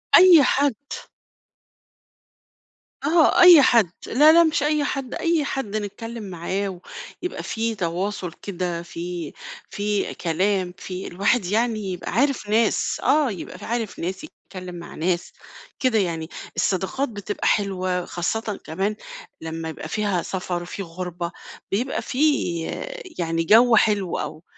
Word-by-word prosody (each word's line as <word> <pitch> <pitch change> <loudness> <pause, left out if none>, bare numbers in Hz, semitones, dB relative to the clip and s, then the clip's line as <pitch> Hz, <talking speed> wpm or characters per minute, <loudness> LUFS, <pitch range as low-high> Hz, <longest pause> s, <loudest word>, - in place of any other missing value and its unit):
أي 355 -5 +9
حد. 280 -1 +2 2.3
آه، 330 +3 +4
أي 350 -5 +10
حد. 225 -9 +4 0.2
لا 300 +6 +6
لأ، 340 0 +7
مش 315 -2 +1
أي 300 0 +2
حد، 275 -3 -3
أي 330 -4 +1
حد 225 -7 -3
نتكلم 225 +2 -5
معاه 185 +1 -3 0.4
ويبقى 360 - -4
في 225 0 -2
تواصل 180 0 -3
كده، 180 -3 -4
في 170 -2 -6 0.4
في 205 0 -1
كلام، 185 +2 0
في 185 0 -6
الواحد 200 +3 +1
يعني 220 +3 +1
يبقى 175 - -6
عارف 250 -1 +1
ناس. 225 +2 +2
آه، 295 -6 +3
يبقى 185 - -7
ف - - -13
عارف 230 -2 -3
ناس، 185 - -4
يتكلم 185 - -10
مع 170 - -9
ناس، 175 +2 -1 0.5
كده 255 -5 +2
يعني. 165 -3 -2 0.3
الصداقات 195 +9 0
بتبقى 205 -1 -3
حلوة، 185 -3 0
خاصةً 210 +4 -3
كمان 195 +6 -2 0.5
لمّا 160 0 -5
يبقى 160 - -7
فيها 205 -5 0
سفر، 180 -2 -4
في 195 +2 -6
غربة، 175 0 -5 0.4
بيبقى 245 +7 -1
في 265 -1 -5 1.0
يعني 165 -1 0
جو 230 +6 +6
حلو 205 -4 +2
أو 155 +2 -6
200 Hz, 130 wpm, -23 LUFS, 175-240 Hz, 2.3 s, أي